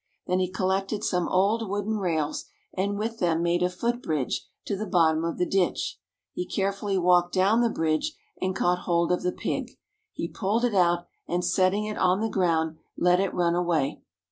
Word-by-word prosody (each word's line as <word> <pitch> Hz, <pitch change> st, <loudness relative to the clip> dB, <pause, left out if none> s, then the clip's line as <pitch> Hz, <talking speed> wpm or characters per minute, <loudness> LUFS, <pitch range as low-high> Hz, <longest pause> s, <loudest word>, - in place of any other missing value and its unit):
Then 180 Hz, +1 st, +1 dB
he 185 Hz, -1 st, 0 dB
collected 195 Hz, +2 st, -1 dB
some 180 Hz, -2 st, 0 dB
old 205 Hz, +4 st, +2 dB
wooden 205 Hz, +2 st, -1 dB
rails, 160 Hz, -5 st, -1 dB, 0.3 s
and 200 Hz, +2 st, -1 dB
with 225 Hz, +2 st, -3 dB
them 170 Hz, -1 st, +1 dB
made 175 Hz, 0 st, +1 dB
a 180 Hz, -, +3 dB
foot 235 Hz, +7 st, -2 dB
bridge 150 Hz, -, -2 dB, 0.2 s
to 205 Hz, -, -1 dB
the 210 Hz, +2 st, -4 dB
bottom 160 Hz, -3 st, +3 dB
of 170 Hz, 0 st, -2 dB
the 180 Hz, -, +1 dB
ditch. 195 Hz, -, 0 dB, 0.3 s
He 360 Hz, -, -2 dB
carefully 195 Hz, 0 st, -1 dB
walked 175 Hz, 0 st, +3 dB
down 200 Hz, +5 st, +4 dB
the 235 Hz, -, +3 dB
bridge, 160 Hz, -, -1 dB, 0.2 s
and 185 Hz, 0 st, -1 dB
caught 180 Hz, -1 st, +2 dB
hold 170 Hz, 0 st, +2 dB
of 180 Hz, -, +1 dB
the 180 Hz, -, 0 dB
pig. -, -, -4 dB, 0.3 s
He -, -, -4 dB
pulled 220 Hz, +4 st, 0 dB
it 240 Hz, -, 0 dB
out, 175 Hz, -2 st, +3 dB, 0.2 s
and 175 Hz, +1 st, -1 dB
setting 185 Hz, +3 st, +2 dB
it 215 Hz, 0 st, -4 dB
on 185 Hz, +1 st, +3 dB
the 220 Hz, +1 st, 0 dB
ground, 165 Hz, -5 st, +1 dB, 0.2 s
let 180 Hz, +1 st, +4 dB
it 195 Hz, -1 st, +1 dB
run 170 Hz, -1 st, +1 dB
away. 170 Hz, -5 st, 0 dB
185 Hz, 195 wpm, -26 LUFS, 175-200 Hz, 0.3 s, down